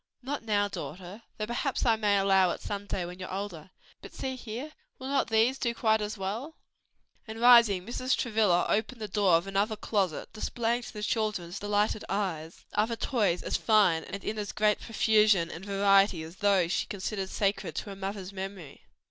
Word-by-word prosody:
"Not 280 +3 -3
now, 205 -2 +1
daughter, 190 +1 -8 0.2
though 215 - -2
perhaps 240 +4 -2
I 230 -2 +4
may 210 -2 +2
allow 195 -2 +4
it - - -3
some 205 0 -5
day 180 -3 -2
when 180 +1 -9
you 185 - -5
are - - -7
older. 190 -5 -6 0.3
But - - -12
see 260 -1 -3
here! 250 +5 -7 0.3
will 260 +1 -7
not 275 -1 +1
these 225 +4 +2
do 235 -1 -1
quite 220 -1 +2
as 210 +1 -4
well?" 220 +11 -4 0.7
And 220 +1 -7
rising, 235 -6 +6
Mrs. 255 +3 -1
Travilla 215 -7 +2
opened 220 +3 -1
the 215 - -4
door 200 -2 +2
of 170 +2 +1
another 200 +3 0
closet 200 -6 -2
displaying 235 +2 -1
to - - -9
the 210 -1 -6
children's 210 -5 -2
delighted 205 +1 0
eyes 175 -5 -3
other 220 +3 +1
toys 215 -8 0
as - - -1
fine 200 -8 +3
and 200 0 -7
in 215 0 -3
as 205 -1 -4
great 210 -1 +2
profusion 210 -6 +3
and 165 - -8
variety 195 -3 +3
as 165 +3 -11
those 195 -4 +2
she - - 0
considered 195 -1 -4
sacred 200 +1 -1
to 205 - -4
her - - -7
mother's 195 0 -5
memory. 190 -6 -8
205 Hz, 190 wpm, -29 LUFS, 190-225 Hz, 0.7 s, rising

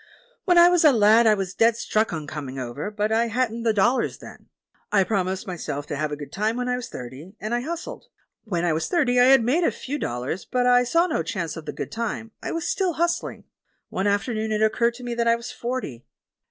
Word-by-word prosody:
When 355 -1 +4
I 345 0 +9
was 355 -1 +3
a 305 - +7
lad 225 0 +5
I 215 - +5
was 195 -2 -4
dead 230 0 +3
stuck 220 -1 0
on 160 -3 -4
coming 140 -3 -6
over, 130 +8 -4
but 210 0 -2
I 230 +1 +2
hadn't 230 0 -1
the 230 -1 +2
dollars 225 +5 +1
then. - - -13 0.4
I 195 -2 +4
promised 190 -2 -1
myself 155 -6 -5
to 150 - -4
have 150 +1 -2
a - - -2
good 145 -1 -9
time 215 +3 -1
when 250 0 -2
I 250 - +1
was 250 -1 -6
thirty, 130 - -9
and 215 +2 -4
I 240 - +1
hustled. 340 - -6 0.4
When 175 -6 -2
I 170 - +2
was 160 - -1
thirty 270 -9 +2
I 245 - +7
had 265 -2 +6
made 285 +10 +2
a - - +4
few 290 +3 -5
dollars, 125 - -3
but 250 -1 -1
I 245 0 +5
saw 335 +7 +3
no 330 - -1
chance 165 0 -4
of 160 -2 -9
the - - -2
good - - -6
time 225 -1 -4
— - - -54
I - - -4
was 335 +1 -3
still 375 -3 0
hustling. 345 +2 -2 0.5
One 190 +2 -1
afternoon 215 +2 -1
it 215 0 +1
occurred 235 +2 +2
to 250 - -11
me 240 -1 -3
that 235 0 0
I 230 - +5
was 235 0 -7
forty. 235 - -5
225 Hz, 245 wpm, -24 LUFS, 185-250 Hz, 0.5 s, I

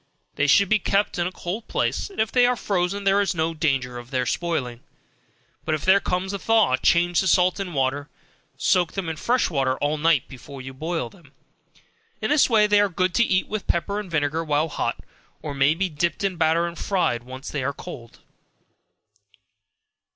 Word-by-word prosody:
They 145 - 0
should 200 +7 +5
be 215 +2 +3
kept 200 0 0
in 175 - +1
a - - -5
cold 185 +5 -6
place, - - -1
and 395 - -11
if 220 0 +1
they 245 -1 +4
are 250 - +2
frozen 200 -2 -1
there 195 +1 +3
is 195 -2 -1
no 160 0 0
danger 135 -6 -1
of 120 0 -12
their 130 -1 -1
spoiling, 130 -7 -2 0.8
but 155 - 0
if 155 - -6
there 190 +1 +6
comes 185 +1 -2
on - - -1
a - - -17
thaw, 220 -10 +3
change 175 +5 +2
the 190 - -1
salt 180 +2 +3
and 180 -5 -5
water, 135 +2 -1 0.5
soak 180 -3 +2
them 195 -3 -4
in 160 - -3
fresh 240 +6 0
water 135 -3 0
all 150 +1 -1
night 160 -4 +2
before 135 +1 -11
you 130 +1 -8
boil 160 -2 -3
them. 155 -7 -20 0.9
In - - -2
this 300 -3 +4
way 220 -3 +5
they 210 0 +4
are 205 0 +3
good 185 0 0
to 235 - +4
eat 190 -4 +1
with 215 -1 -5
pepper 200 +4 -1
and 205 -3 -7
vinegar 160 0 0
while 155 +1 0
hot, - - -3 0.4
or 150 - -4
may 140 +3 +3
be 190 +3 0
dipped 170 +3 -2
in 195 -2 0
batter 165 0 +2
and 170 0 -6
fried 125 -11 -1
after 130 +2 -8
they 145 -3 -2
are 140 - 0
cold. 135 -6 -11
170 Hz, 205 wpm, -23 LUFS, 145-195 Hz, 0.9 s, there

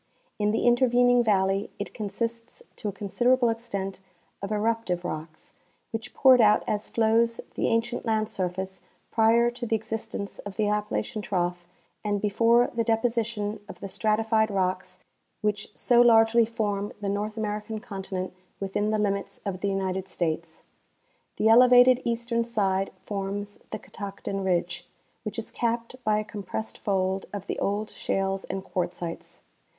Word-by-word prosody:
In 210 0 +2
the 220 - +1
interven 245 0 +5
ing 245 -1 +5
valley 195 -2 +2
it 205 - -5
consists 230 +2 -4
to - - -4
a - - 0
considerable 240 +5 +2
extent 200 -5 -3 0.4
of 200 +1 -4
eruptive 210 -4 0
rocks, 160 -1 -6 0.4
which 225 +2 -5
poured 260 -2 +7
out 210 -1 +5
as 210 0 -2
flows 230 +1 +2
the - - 0
ancient 230 +1 0
land 220 -2 +1
surface 190 0 -3 0.3
prior 230 +1 +4
to 240 0 -5
the 225 - +2
existence 220 -2 -4
of 205 -1 -7
the 215 -2 +1
Appalachian 210 +1 -1
trough 175 -3 -2 0.4
and 205 -1 0
before 230 +4 +3
the 230 -1 +1
deposition 225 -2 0
of - - -9
the - - -5
stratified 220 +2 +1
rocks 185 -1 -1 0.4
which 210 -1 -1
so 240 -1 +5
largely 230 -1 +6
form 205 -3 -2
the 205 - -4
North 210 +2 -2
American 210 0 -3
continent 190 -5 -5 0.3
within 200 +2 -1
the 215 - +1
limits 200 -1 -1
of 190 -2 -3
the 200 - 0
United 190 -1 -1
States. 165 -2 -3 0.7
The 220 - +2
elevated 250 +2 +7
eastern 235 0 0
side 195 -5 0
forms 205 0 -4
the - - -4
Catoctin 200 -1 -6
ridge, 175 -1 -1 0.3
which 215 0 -6
is 225 - -5
capped 235 +1 -2
by 215 -1 +2
a 215 - 0
com 210 -1 -7
pressed 220 +3 -5
fold 190 -1 0
of 200 -2 -5
the - - -3
old 205 +2 -1
shales 195 0 -1
and 195 - -4
quartzites. 175 -2 -4
210 Hz, 155 wpm, -27 LUFS, 195-230 Hz, 0.7 s, poured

